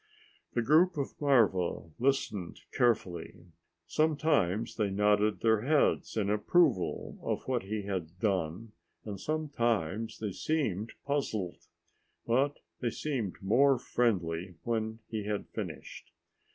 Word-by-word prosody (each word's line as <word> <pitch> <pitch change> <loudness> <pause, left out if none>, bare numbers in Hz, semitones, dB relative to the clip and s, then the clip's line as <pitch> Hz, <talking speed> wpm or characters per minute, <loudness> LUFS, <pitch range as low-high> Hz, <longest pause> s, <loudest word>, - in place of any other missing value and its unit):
The 120 - +2
group 160 +7 +4
of 140 - -2
marva 105 - +2
listened 115 -8 -1
carefully. 105 -8 0 0.5
Sometimes 120 - +1
they 105 -3 0
nodded 105 +1 +2
their 110 -2 +3
heads 145 -2 +2
in 105 -2 +1
approval 105 - +2
of - - -3
what 125 -2 +1
he 105 +2 -4
had 90 -3 -4
done, 95 0 -1 0.3
and 100 -3 -5
sometimes 115 - -1
they 105 -2 -3
seemed 110 - -1
puzzled. 110 -11 -2 0.6
But 135 +5 +1 0.2
they 120 - 0
seemed 115 -9 -3
more 135 +7 +4
friendly 90 -8 0
when 110 -1 -2
he 110 -2 -4
had 105 -1 -2
finished. - - -7
110 Hz, 115 wpm, -31 LUFS, 95-135 Hz, 0.6 s, group